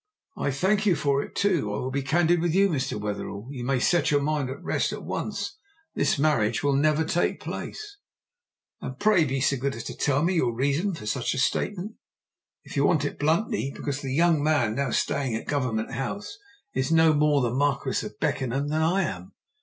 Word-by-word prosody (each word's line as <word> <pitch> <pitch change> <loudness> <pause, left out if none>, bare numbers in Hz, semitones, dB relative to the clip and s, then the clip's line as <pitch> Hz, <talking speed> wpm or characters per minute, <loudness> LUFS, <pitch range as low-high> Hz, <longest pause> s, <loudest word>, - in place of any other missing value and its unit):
"I - - -1
thank 195 +10 +1
you 185 - +4
for 140 -2 +1
it. - - -9
I, - - +1
too, 180 - +2
will 105 +6 -3
be 140 +1 -1
candid 165 +4 +2
with 170 -1 0
you. 200 +1 +5
Mr. 140 - -2
Wetherell, 105 +1 -5
you 130 -4 -6
may 130 +1 +1
set 165 +3 +2
your 145 -1 +2
mind 145 -3 0
at 130 - -7
rest - - 0
at - - -6
once, - - -4 0.3
this - - +1
marriage 130 -7 +1
will 145 -1 +2
never 155 +3 +2
take 175 - 0
place!" 415 -2 -7 0.8
"And 130 - -6
pray 210 -4 +4
be 135 -1 -1
so 135 +1 +2
good 135 +1 -2
as 115 - -6
to - - -6
tell 145 +1 +1
me 175 +3 +2
your 125 -9 +1
reason 145 - 0
for 125 - -9
such 115 +5 -1
a - - -4
statement?" 200 +10 -1 0.7
"If - - -10
you 140 - +2
want 150 -1 +3
it - - -4
bluntly, 155 -1 +1
because 145 0 -3
the 135 - -4
young 165 +1 +3
man 145 -8 +2
now 140 +2 -1
staying 130 0 0
at 115 - -4
Government 125 -6 -1
House 200 - -5 0.3
is 130 +3 -1
no 160 -1 +5
more 150 -1 +3
the 120 - 0
Marquis 140 0 0
of - - -8
Beckenham 135 +3 -1
than 155 +1 0
I 180 +5 +2
am. 90 - -5
145 Hz, 210 wpm, -26 LUFS, 130-165 Hz, 0.8 s, you